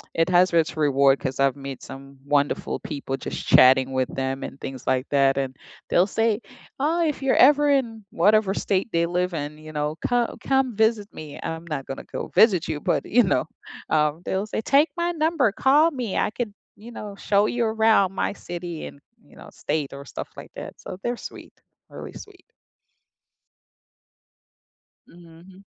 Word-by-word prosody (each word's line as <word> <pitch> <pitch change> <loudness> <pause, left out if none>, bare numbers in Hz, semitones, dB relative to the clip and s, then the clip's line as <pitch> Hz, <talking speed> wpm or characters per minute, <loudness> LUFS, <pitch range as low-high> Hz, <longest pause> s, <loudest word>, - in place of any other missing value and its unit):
It 165 0 +2
has 180 0 +4
its 160 -2 +2
reward 140 -3 +3
'cause 130 -2 -4
I've 135 -1 +3
met 135 -1 -8
some 135 0 -11
wonderful 145 0 0
people 140 -3 -5
just - - -6
chatting 130 +1 +6
with 130 -1 0
them 135 0 -2
and 140 - -8
things 130 -2 -8
like 130 +1 +1
that 135 -1 +3
and 135 -1 -2 0.3
they'll 180 +2 +3
say, 225 +2 0 0.4
"Oh 320 +5 +1
if 295 -3 -2
you're 270 - +2
ever 295 0 +2
in" 235 -6 0
whatever 205 +2 +3
state 195 +2 -1
they 170 0 +2
live 180 +1 -1
in, 150 0 -5
you 155 0 -11
know, 150 +1 -2
"Co 245 -1 0
come 265 -3 +1
visit 220 -1 +2
me," 150 -2 -9
I'm 165 +1 -5
not 145 -4 -4
gonna 135 - -7
go - - -5
visit 195 -7 +4
you 155 -2 -3
but - - 0
you 245 +2 +4
know, 185 - +1 0.4
um, 150 +1 +1
they'll 195 +3 -2
say 220 - -3
"Take 285 +7 +3
my 345 0 0
number, 315 -7 +1
call 290 +9 +4
me, 245 -7 -3
I - - +1
could, 230 -1 -4 0.2
you 230 +3 -12
know, 205 -3 -8
show 200 0 +2
you 240 +1 0
around 220 -3 +3
my 195 - -1
city 175 -3 -7
and" - - -13 0.2
You - - -21
know, - - -12
state, 150 -3 -3
or 140 0 -8
stuff - - -7
like - - -11
that. - - -9
So, 185 - -8
they're 240 +1 -1
sweet, - - -13 0.4
really - - -9
sweet. 395 -3 -13 2.6
Mhm. 175 +3 -17
180 Hz, 180 wpm, -24 LUFS, 145-225 Hz, 2.6 s, chatting